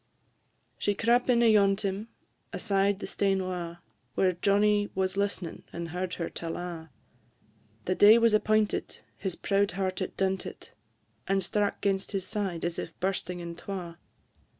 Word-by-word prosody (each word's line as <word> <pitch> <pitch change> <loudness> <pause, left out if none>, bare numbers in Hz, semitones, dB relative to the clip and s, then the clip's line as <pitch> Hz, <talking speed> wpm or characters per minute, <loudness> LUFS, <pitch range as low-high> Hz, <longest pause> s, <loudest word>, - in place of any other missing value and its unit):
She 205 - +1
crap 240 +4 +2
in 240 -1 +5
ayont 210 -3 +4
him, 200 +2 -2 0.4
aside 200 -1 +1
the - - -6
stane 195 -2 0
wa', 175 -2 -4 0.4
Whare 185 -1 +3
Johnnie 205 +3 +2
was 190 0 0
list'ning, 200 -4 -2
and 170 -1 -5
heard 180 +2 -3
her 170 - -3
tell 165 -1 -5
a'; 170 -2 -6 1.0
The 185 - +1
day 205 +4 +8
was 230 -1 +4
appointed, 215 0 +1 0.2
his 190 -3 -4
proud 200 -2 +1
heart 190 0 -1
it 185 - -4
dunted, 190 -1 -2 0.6
And 195 0 +1
strack 205 +2 -1
'gainst 195 0 0
his 190 -2 -1
side 195 -6 -2
as 170 0 -2
if - - -7
bursting 180 -1 -2
in 170 0 -6
twa. 175 -2 -6
195 Hz, 150 wpm, -29 LUFS, 180-205 Hz, 1.0 s, day